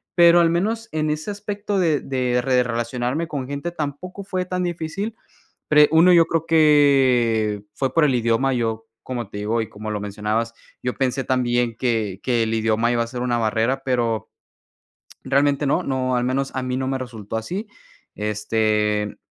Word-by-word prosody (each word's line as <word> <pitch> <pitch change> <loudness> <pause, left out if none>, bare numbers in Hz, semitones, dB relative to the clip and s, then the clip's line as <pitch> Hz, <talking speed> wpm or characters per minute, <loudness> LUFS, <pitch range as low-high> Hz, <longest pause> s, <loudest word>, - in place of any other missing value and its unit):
pero 170 0 +7
al 170 -1 +4
menos 220 +7 -1
en 155 -1 0
ese 155 +5 -3
aspecto 205 0 -4
de 160 -5 +2
de 125 -2 -1
re 125 -1 +2
relacionarme 120 +6 -2
con 140 -6 -4
gente 145 +5 -4
tampoco 175 +5 -5
fue 185 -2 -3
tan 180 0 -2
difícil. 175 +5 -3 0.6
Pre 150 -1 +6
1, 170 +3 +6
yo 170 -2 +6
creo 165 -1 -1
que 130 -9 +3
fue 130 -1 -2
por 165 - +4
el 135 - +2
idioma. 120 +3 +1
Yo, 115 -2 -2 0.2
como 120 -5 -5
te 100 - -8
digo, 110 +3 -1
y 110 - -6
como 110 +1 -7
lo 105 - -3
mencionabas, 105 +3 -2 0.3
yo 125 - -2
pensé 130 0 -1
también 120 -2 0
que 110 -6 -1
que 120 -3 +1
el 110 - -3
idioma 110 +1 +1
iba 120 - +1
a 115 - -3
ser 120 +1 -6
una 120 -1 0
barrera, 115 +4 0
pero 120 -4 -1 0.9
realmente 140 +1 +2
no, 140 - +1
no, 130 -2 -1
al 120 - 0
menos 135 +2 -1
a 130 - -2
mí 125 0 -2
no 130 - -2
me 135 - -1
resultó 115 -4 -6
así. 185 - -4 0.5
Este, 105 0 0
130 Hz, 180 wpm, -22 LUFS, 115-155 Hz, 0.9 s, pero